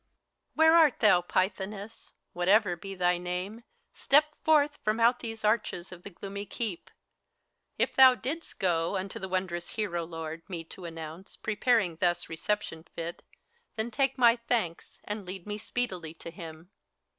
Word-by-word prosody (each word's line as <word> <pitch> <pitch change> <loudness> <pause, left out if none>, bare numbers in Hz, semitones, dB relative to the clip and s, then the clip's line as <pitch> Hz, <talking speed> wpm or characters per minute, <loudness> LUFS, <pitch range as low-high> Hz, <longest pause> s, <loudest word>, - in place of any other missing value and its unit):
HELENA. - - -51
Where 320 +1 +6
art 300 -5 +3
thou, 210 -5 +6
Pythoness? 195 +4 -3 0.2
Whatever 185 +1 +3
be 195 +3 -8
thy 180 -1 +2
name, 180 +6 -4 0.3
Step 295 +2 +5 0.2
forth 295 -2 +3
from 215 +2 +1
out 235 +2 +4
these 225 -2 -6
arches 210 -5 0
of 180 -1 -10
the 200 - -8
gloomy 200 +2 -7
keep! 210 -6 -4 0.9
If - - 0
thou 260 -1 +8
didst 300 +7 -5
go, 170 -1 +1
unto 190 +1 -5
the 190 - -5
wondrous 180 -2 -2
hero 185 -6 -2
lord 165 -1 -6
Me 170 -3 -4
to 175 +2 -11
announce, 165 +2 -8
preparing 215 -5 +1
thus 175 0 0
reception 160 -1 -2
fit, 170 +1 -5 0.5
Then 220 +2 -2
take 270 +3 +1
my 240 -1 +6
thanks, 230 -8 -2
and 210 0 -4
lead 185 -1 -7
me 210 0 -4
speedily 185 -10 -3
to 170 - -9
him 165 +1 -10
195 Hz, 155 wpm, -29 LUFS, 175-225 Hz, 0.9 s, thou